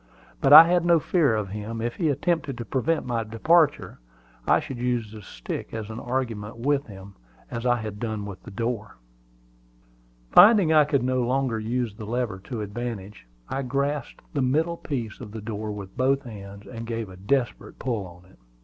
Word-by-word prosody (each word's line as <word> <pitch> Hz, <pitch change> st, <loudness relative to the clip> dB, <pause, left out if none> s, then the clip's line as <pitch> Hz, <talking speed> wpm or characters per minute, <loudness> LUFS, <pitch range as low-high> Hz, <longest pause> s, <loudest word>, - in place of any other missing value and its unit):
But 135 Hz, -, +2 dB
I 155 Hz, +2 st, +13 dB
had 175 Hz, +1 st, +2 dB
no 170 Hz, -1 st, +5 dB
fear 150 Hz, -7 st, +2 dB
of 105 Hz, -3 st, -2 dB
him: 105 Hz, +3 st, -5 dB
if 120 Hz, +1 st, -2 dB
he 165 Hz, -4 st, +1 dB
attempted 150 Hz, -2 st, -1 dB
to 120 Hz, -, -5 dB
prevent 155 Hz, +7 st, 0 dB
my 120 Hz, -2 st, -1 dB
departure, 145 Hz, +8 st, +2 dB, 0.5 s
I -, -, +5 dB
should 130 Hz, -, -7 dB
use 120 Hz, -3 st, -1 dB
the 110 Hz, -1 st, -10 dB
stick 60 Hz, -, -7 dB
as 110 Hz, -1 st, -5 dB
an 110 Hz, -, -6 dB
argument 115 Hz, -4 st, -3 dB
with 140 Hz, +3 st, 0 dB
him, 100 Hz, -1 st, -11 dB, 0.4 s
as 115 Hz, +1 st, -3 dB
I 120 Hz, -, +4 dB
had 110 Hz, -3 st, -6 dB
done 110 Hz, -3 st, -3 dB
with 100 Hz, -2 st, -8 dB
the -, -, -11 dB
door. 115 Hz, 0 st, -4 dB, 1.3 s
Finding 205 Hz, -7 st, +7 dB
I 155 Hz, -1 st, +6 dB
could 140 Hz, -3 st, +1 dB
no 130 Hz, 0 st, +1 dB
longer 125 Hz, -2 st, 0 dB
use 115 Hz, 0 st, -2 dB
the 105 Hz, 0 st, -9 dB
lever 120 Hz, -4 st, -2 dB
to 120 Hz, -4 st, -4 dB
advantage, 105 Hz, -, -6 dB, 0.2 s
I 135 Hz, -, -2 dB
grasped 140 Hz, +3 st, -2 dB
the 145 Hz, -, 0 dB
middle 160 Hz, +6 st, +1 dB
piece 120 Hz, -10 st, -5 dB
of 110 Hz, -4 st, -8 dB
the 110 Hz, -, -6 dB
door 105 Hz, 0 st, -4 dB
with 100 Hz, -2 st, -8 dB
both 135 Hz, +2 st, +2 dB
hands, 100 Hz, -4 st, -10 dB
and 115 Hz, -2 st, -8 dB
gave 115 Hz, -2 st, -3 dB
a 95 Hz, -, -11 dB
desperate 120 Hz, +7 st, -2 dB
pull 95 Hz, -8 st, -4 dB
at 95 Hz, -, -21 dB
it. -, -, -23 dB
120 Hz, 190 wpm, -25 LUFS, 105-135 Hz, 1.3 s, I